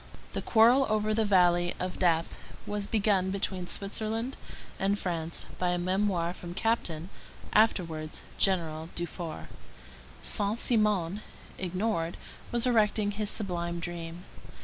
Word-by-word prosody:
The - - -2
quarrel 245 +4 +5
over 215 0 +1
the 220 0 +2
valley 175 -3 +4
of 185 0 -3
Dappes 165 -3 +2 0.3
was 205 -1 -2
begun 200 -4 +2
between 190 -2 -2
Switzerland 220 +6 -2 0.4
and 195 +1 +2
France 170 -4 -3
by 180 - +1
a 175 - +1
memoir 180 -1 0
from 175 -1 -8
Captain, 180 -7 -1 0.4
afterwards 165 -8 +2 0.2
General 165 -4 +1
Dufour. 170 -1 -5 0.8
Saint 205 +2 +1
Simon, 210 -6 +2 0.4
ignored, 180 -2 -1 0.3
was 235 0 +2
erecting 215 -3 +3
his 205 0 -1
sublime 175 -5 0
dream. 170 0 -6
190 Hz, 120 wpm, -29 LUFS, 175-215 Hz, 0.8 s, quarrel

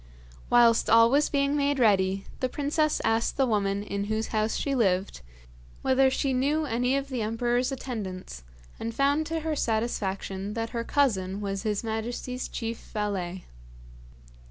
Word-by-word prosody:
Whilst 235 -1 +5
all 230 +1 +6
was 290 +2 +3
being 280 0 +1
made 285 -1 +1
ready 195 -5 +2
the 255 - 0
princess 300 +3 0
asked 225 +1 +1
the 270 - +4
woman 200 -3 0
in 200 -1 -3
whose 220 +1 -2
house 215 0 0
she 280 - -1
lived 195 - +1 0.6
whether 265 0 +4
she 265 0 0
knew 290 +5 +1
any 250 +1 +1
of 275 0 -4
the 255 -4 -2
emperor's 240 +4 0
attendants, 195 - -6 0.4
and 230 0 -4
found 285 +3 +2
to 325 0 -2
her 315 0 -2
satisfaction 205 -4 -2
that 225 0 -3
her 235 -1 -2
cousin 200 -9 +1
was 195 -1 -3
his 210 -1 -1
majesty's 235 +3 -4
chief 230 -1 -4
valet. 190 -4 -4
230 Hz, 155 wpm, -27 LUFS, 205-270 Hz, 0.6 s, all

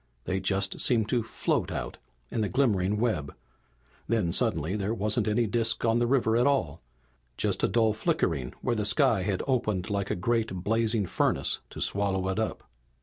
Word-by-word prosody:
They 95 +6 -1
just 95 0 -1
seemed 115 -3 +2
to 125 -2 +2
float 110 - -1
out, - - -5 0.3
in 115 - -1
the 105 - 0
glimmering 105 -7 +1
web. 105 -11 -1 0.7
Then, 110 -7 +1
suddenly, 95 - +1
there 105 +2 -1
wasn't 105 0 0
any 110 +2 +2
disk 115 +2 0
on 115 +1 +3
the 120 - +1
river 120 -4 +2
at 120 +3 +3
all 85 - 0 0.6
just - - 0
a - - +5
dull 110 -2 +2
flickering 85 - -1
where 120 - +1
the 105 - -1
sky 120 -2 +3
had 95 0 -1
opened 110 -8 -1
like 100 -1 -1
a - - 0
great, 115 +4 0
blazing 110 0 +1
furnace - - 0
to - - -9
swallow 95 -2 +1
it 95 - -1
up. 110 - -2
110 Hz, 180 wpm, -28 LUFS, 95-115 Hz, 0.7 s, a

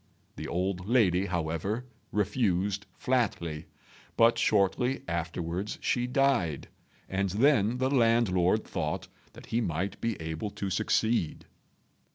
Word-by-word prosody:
The - - -6
old 90 +1 -2
lady, 100 -6 +3
however, 85 +7 -2 0.3
refused 100 -2 0
flatly; 85 -11 -1 0.5
but 115 +1 +5
shortly 110 +6 +2
afterwards 85 +3 -3
she 120 0 0
died, 125 - +1 0.4
and 95 +1 -1
then 115 +1 +3
the 130 +1 0
landlord 115 -6 +3
thought 75 -5 -3 0.3
that - - -12
he 115 - +2
might 90 0 -2
be 115 -3 -1
able 80 +5 -4
to 100 -1 -4
succeed. 110 -3 0
100 Hz, 115 wpm, -29 LUFS, 90-115 Hz, 0.5 s, but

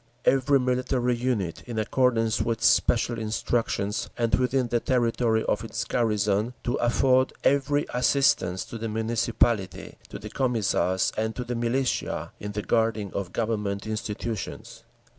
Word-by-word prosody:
Every 135 +1 +4
military 125 -1 0
unit, 120 -8 -2
in 120 -2 -5
accordance 115 0 +1
with 115 -1 -2
special 115 0 +3
instructions 110 -2 -1
and 115 -1 0
within 125 0 +2
the 120 - +1
territory 115 -2 +1
of 105 - -1
its 115 0 -3
garrison, 105 0 0
to 120 - -1
afford 130 +2 +2
every 140 +1 +2
assistance 125 -8 +2
to 115 - -8
the 115 0 -3
Municipality, 110 -3 -1
to - - -7
the - - -9
Commissars, 110 -7 +1
and 110 0 -2
to 125 - -3
the 125 0 -4
militia, 120 +2 -1
in 105 0 -6
the 105 0 -3
guarding 110 -3 0
of 95 -3 -4
Government 105 -3 -2
institutions. 110 -1 -5
115 Hz, 140 wpm, -26 LUFS, 105-125 Hz, -, Every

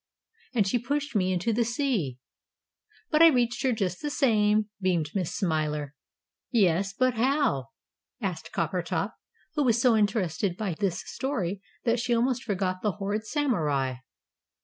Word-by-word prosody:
And 210 -4 +3
she 240 +5 +1
pushed 285 +3 -2
me 185 -2 +2
Into 185 +5 0
the 235 +2 +2
sea. 230 - -1 0.9
But 305 0 +4
I 330 - +10
reached 245 -5 +2
here 260 - +2
just 195 -6 -2
the 295 - -2
same!" 215 -7 +3
beamed 170 -5 +1
Miss 185 -5 -2
Smiler. 150 -5 -1 0.6
"Yes, 195 -4 +2
but 255 +5 +1
how?" 240 - +1 0.5
asked 180 -8 -4
Coppertop, 170 +4 -1 0.4
who 295 - +1
was 235 -3 +3
so 235 -1 +4
interested 200 -4 0
by 205 -5 -2
this 180 +1 -2
story 205 -9 -3 0.2
that 235 0 +2
she 240 +1 +1
almost 245 +1 +1
forgot 185 -3 -1
the 210 -3 0
horrid 210 +2 -3
Samurai. 150 - 0
210 Hz, 150 wpm, -27 LUFS, 180-245 Hz, 0.9 s, I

